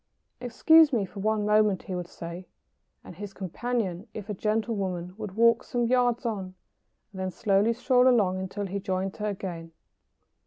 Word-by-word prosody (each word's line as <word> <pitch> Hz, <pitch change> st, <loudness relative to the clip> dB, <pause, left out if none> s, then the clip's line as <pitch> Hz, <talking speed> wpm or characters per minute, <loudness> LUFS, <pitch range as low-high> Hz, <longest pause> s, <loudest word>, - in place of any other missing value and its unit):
] -, -, -49 dB
"Excuse 310 Hz, +6 st, +5 dB
me 225 Hz, -6 st, +1 dB
for 200 Hz, +2 st, -10 dB
one 215 Hz, +1 st, 0 dB
moment," 210 Hz, -2 st, +3 dB
he 185 Hz, -, -6 dB
would 180 Hz, -1 st, -4 dB
say, 170 Hz, +2 st, -8 dB, 0.6 s
and -, -, -11 dB
his 205 Hz, -1 st, -8 dB
companion, 200 Hz, 0 st, -3 dB
if 215 Hz, -1 st, -7 dB
a -, -, -2 dB
gentlewoman, 200 Hz, -4 st, -2 dB
would 210 Hz, -3 st, -7 dB
walk 230 Hz, +1 st, +4 dB
some 240 Hz, -1 st, -1 dB
yards 245 Hz, 0 st, +1 dB
on, 195 Hz, -5 st, -3 dB, 0.6 s
and 190 Hz, -, -8 dB
then 185 Hz, -, -1 dB
slowly 200 Hz, +3 st, +2 dB
stroll 250 Hz, +1 st, +3 dB
along 200 Hz, -7 st, +3 dB
until 195 Hz, +2 st, -4 dB
he 195 Hz, +1 st, -3 dB
joined 190 Hz, 0 st, -2 dB
her 210 Hz, -1 st, -2 dB
again. 170 Hz, -4 st, -6 dB
205 Hz, 170 wpm, -27 LUFS, 185-230 Hz, 0.6 s, Excuse